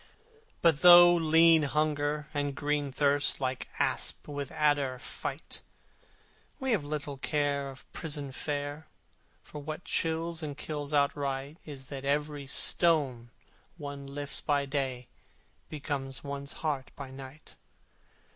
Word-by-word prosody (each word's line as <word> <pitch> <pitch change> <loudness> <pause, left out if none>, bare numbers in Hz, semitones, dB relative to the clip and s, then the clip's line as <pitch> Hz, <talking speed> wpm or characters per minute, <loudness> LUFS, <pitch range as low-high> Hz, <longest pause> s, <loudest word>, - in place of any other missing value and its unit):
But 165 -4 +4
though 175 0 +10
lean 165 -1 +5
Hunger 150 0 0
and 145 -1 -1
green 145 -1 -1
Thirst 145 +1 +3
Like 130 -1 -2
asp - - 0
with 145 -2 -4
adder 145 -4 +1
fight, - - -6 1.0
We 265 -1 0
have 210 -9 +2
little 145 -1 -4
care 140 0 -1
of 135 -1 -12
prison 145 -4 -3
fare, 145 +2 -4 0.6
For 150 - -9
what 155 +4 -6
chills 165 +1 0
and 150 -2 -5
kills 145 -2 -5
outright 140 0 0
Is 135 -3 -8
that 140 -2 -6
every 145 0 -1
stone 135 -7 +2 0.5
one 140 -2 -7
lifts 145 +1 -2
by 145 -2 +1
day 135 -3 -2 0.6
Becomes 140 -3 -4
one's 140 0 -5
heart 140 -4 -1
by 135 -2 -8
night. 135 +3 -11
145 Hz, 125 wpm, -30 LUFS, 140-155 Hz, 1.0 s, though